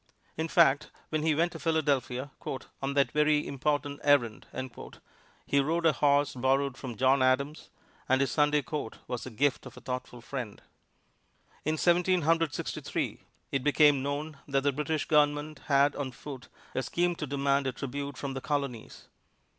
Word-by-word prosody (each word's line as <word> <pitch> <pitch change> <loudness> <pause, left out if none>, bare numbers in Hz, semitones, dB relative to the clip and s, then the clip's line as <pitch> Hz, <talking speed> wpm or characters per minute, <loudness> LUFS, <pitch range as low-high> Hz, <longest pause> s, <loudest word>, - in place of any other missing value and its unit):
In 160 +1 -2
fact, 165 -4 +4 0.2
when 155 -1 0
he 155 -1 +2
went 170 +3 +2
to 165 - -8
Philadelphia 140 -5 0 0.5
"on 135 +1 -2
that 140 -1 +3
very 150 0 +3
important 145 +1 -1
errand," 140 -7 +2 1.0
he 140 - +2
rode 165 +4 0
a 160 - +7
horse 145 +1 +3
borrowed 135 +1 +1
from 125 -5 -7
John 130 +2 +4
Adams, 140 +4 +1 0.4
and 130 0 +4
his 140 - +1
Sunday 150 -1 +3
coat 150 -8 -5
was 125 - -4
the - - -5
gift 135 +4 0
of - - -13
a - - -7
thoughtful 125 -1 -5
friend. 120 -3 -6 1.1
In 155 +1 0
Seventeen 180 +1 +3
Hundred 165 0 +2
Sixty - - -4
three, - - -3 0.3
it 135 -2 -1
became 145 -1 +5
known 145 +2 -4
that 135 -1 +1
the 145 - +3
British 150 +2 -1
Government 150 0 +2
had 140 0 +4
on 130 -3 -4
foot 130 -1 -9 0.3
a - - 0
scheme 175 +7 0
to 150 - -4
demand 140 0 +1
a - - 0
tribute 140 +2 -5
from 140 -1 -4
the 135 - -5
Colonies. 140 -6 -4
140 Hz, 170 wpm, -29 LUFS, 135-150 Hz, 1.1 s, a